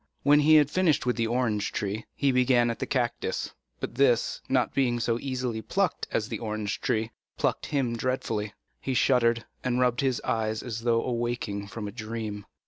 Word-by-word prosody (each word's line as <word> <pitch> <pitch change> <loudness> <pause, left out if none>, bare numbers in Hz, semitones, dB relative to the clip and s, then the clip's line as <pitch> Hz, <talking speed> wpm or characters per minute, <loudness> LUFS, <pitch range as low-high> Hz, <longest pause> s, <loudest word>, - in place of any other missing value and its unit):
When 145 +1 +6
he 155 +1 +6
had 150 -1 +5
finished 180 -8 +2
with 125 - +1
the 115 -1 0
orange 115 -3 0
tree, 105 +2 -3
he 140 -1 +2
began 125 -2 +3
at 115 - -6
the - - -2
cactus; - - -1 0.3
but - - -4
this, 120 -2 +2
not 130 -2 +2
being 125 -3 +1
so 115 0 0
easily 125 -4 -3
plucked - - -1
as - - -1
the - - -4
orange 105 -2 -3
tree, 115 -4 0 0.3
pricked - - 0
him 135 -6 0
dreadfully. 115 -4 -2 0.3
He 130 - -2
shuddered, 120 -3 +3 0.2
and 125 -1 0
rubbed 125 -1 +2
his 130 -3 +1
eyes 110 -1 -1
as 115 -2 -5
though 115 -1 +2
awaking 120 -4 -2
from 105 +2 -6
a - - -5
dream. 110 -2 -5
120 Hz, 185 wpm, -27 LUFS, 110-130 Hz, 0.3 s, When